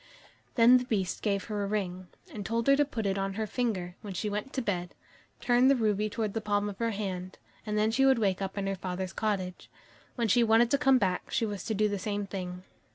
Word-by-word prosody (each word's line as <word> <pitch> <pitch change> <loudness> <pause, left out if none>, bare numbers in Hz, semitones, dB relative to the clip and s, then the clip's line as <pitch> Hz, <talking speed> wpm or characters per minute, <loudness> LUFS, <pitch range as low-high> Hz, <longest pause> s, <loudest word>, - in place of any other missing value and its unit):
Then 245 +1 +7
the 250 - -5
Beast 195 -7 -1
gave 200 -2 0
her 210 -2 -3
a - - -2
ring, 185 -3 -3 0.3
and 210 - -5
told 230 +3 -1
her 275 - +6
to 290 +1 +3
put 230 -6 -4
it 195 0 0
on 195 0 -2
her 220 +1 -1
finger 200 -7 -2
when 205 -3 -7
she 210 +3 -2
went 210 +6 -3
to 265 - -1
bed, 180 -4 -3 0.4
turn 245 +1 +4
the 275 - +6
ruby 215 -3 +1
towards 215 -1 -2
the 225 - -2
palm 205 0 0
of 195 - -9
her 230 0 +1
hand, 190 -3 -4 0.3
and 210 0 -1
then 215 +1 +2
she 270 +4 +2
would 265 -1 +5
wake 195 -4 +1
up 195 +1 -4
in 200 - -1
her 195 - 0
father's 185 -1 -4
cottage. 190 -4 -3 0.5
When 235 -3 0
she 235 +4 +4
wanted 230 +1 +4
to 280 - +3
come 270 -1 +5
back, 185 -6 -1
she 230 - 0
was 205 -3 -4
to 220 - -1
do 210 +1 +3
the 205 -1 -2
same 205 +1 -2
thing. 180 -2 -6
210 Hz, 245 wpm, -29 LUFS, 195-230 Hz, 0.5 s, Then